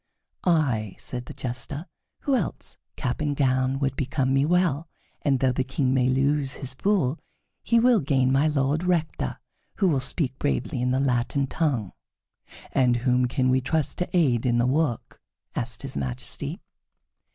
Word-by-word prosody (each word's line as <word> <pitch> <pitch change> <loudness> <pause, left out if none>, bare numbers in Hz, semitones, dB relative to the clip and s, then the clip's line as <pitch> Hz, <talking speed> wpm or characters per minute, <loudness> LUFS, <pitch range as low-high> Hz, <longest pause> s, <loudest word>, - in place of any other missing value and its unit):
"I," 130 - +1
said 125 -1 -6
the - - -7
Jester. 135 +5 -4 0.4
"Who 280 - 0
else? 220 -9 -3 0.2
Cap 125 +4 -2
and 145 -1 0
gown 130 -1 +2
would 135 -1 -1
become 135 -1 0
me 135 +1 +3
well, 165 -2 +1 0.3
and 135 -3 +2
though 130 0 +3
the 130 +1 0
King 130 0 0
may 130 -1 +3
lose 135 +1 +1
his 130 -2 -6
fool, 165 -3 +1 0.4
he 235 - +3
will 240 -1 +5
gain 135 -4 +2
My 135 +3 +3
Lord 145 +2 +1
Rector, 170 -3 -1 0.4
who 195 - +2
will 150 -6 +2
speak 130 0 0
bravely 65 - -1
in 125 - +1
the 130 +1 +1
Latin 135 +1 +1
tongue." 135 - -1 0.8
"And 125 -2 +3
whom 125 0 +3
can 130 0 +1
we 130 +1 +3
trust 150 +3 -1
to 180 - -1
aid 125 -9 +3
in 120 -2 +2
the 120 - +3
work?" 135 -2 -1 0.3
asked - - -3
his - - -3
Majesty. 65 -3 -4
135 Hz, 165 wpm, -25 LUFS, 125-155 Hz, 0.8 s, will